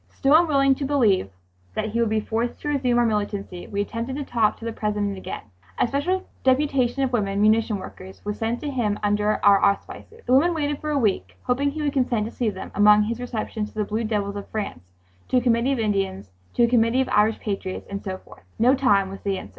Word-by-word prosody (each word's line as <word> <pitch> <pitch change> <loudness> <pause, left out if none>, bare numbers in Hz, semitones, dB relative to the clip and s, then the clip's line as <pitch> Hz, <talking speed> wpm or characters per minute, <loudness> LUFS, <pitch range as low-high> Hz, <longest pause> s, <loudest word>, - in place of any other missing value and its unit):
Still 275 +1 +1
unwilling 285 -4 +5
to 280 - -5
believe 225 - +2 0.5
that 215 0 -2
we 230 - 0
would 230 - +2
be 220 0 +1
forced 230 +3 -2
to 295 - -3
resume 260 -4 +1
our 240 - +4
militancy 205 -4 -3
we 200 0 -2
attempted 230 +5 -4
to 290 - -3
talk 230 -5 +1
to 230 - -10
the 230 - -3
President 210 -2 -2
again 190 - -7 0.3
A - - +2
special 310 +9 -1 0.2
deputation 265 -1 +2
of 260 -1 -1
women 200 -4 0
munition 215 0 +3
workers 190 0 -10
was 210 0 -4
sent 230 +2 -1
to 290 - -3
him 220 -6 0
under 210 +1 +2
our 200 -1 +6
auspices. 435 - -2
The 250 - +1
women 335 +6 +4
waited 295 -2 -2
for 305 - -3
a 295 - +1
week, 215 -7 0
hoping 270 +3 +1
he 305 +2 -4
would 290 -2 0
consent 245 -5 +1
to 225 - -6
see 240 -3 -1
them 190 -2 -7
among 210 0 +6
his 230 +3 -3
receptions—to 220 -3 -4
the 210 -1 -1
Blue 215 +3 -2
Devils 205 -2 -2
of 200 - -7
France, 95 - -5 0.4
to 255 - +2
a - - +3
Committee 240 +2 +2
of - - -1
Indians, 195 - -1 0.2
to 240 - +4
a - - +5
Committee 235 +1 +3
of 265 - -2
Irish 215 +1 +3
Patriots, 195 -3 -4
and 200 0 -6
so 190 -2 -4
forth. - - -17 0.2
"No 245 +4 +4
time," 250 -8 +3
was 195 - -9
the 195 -1 -1
answer. 100 - -8
225 Hz, 230 wpm, -24 LUFS, 205-260 Hz, 0.5 s, our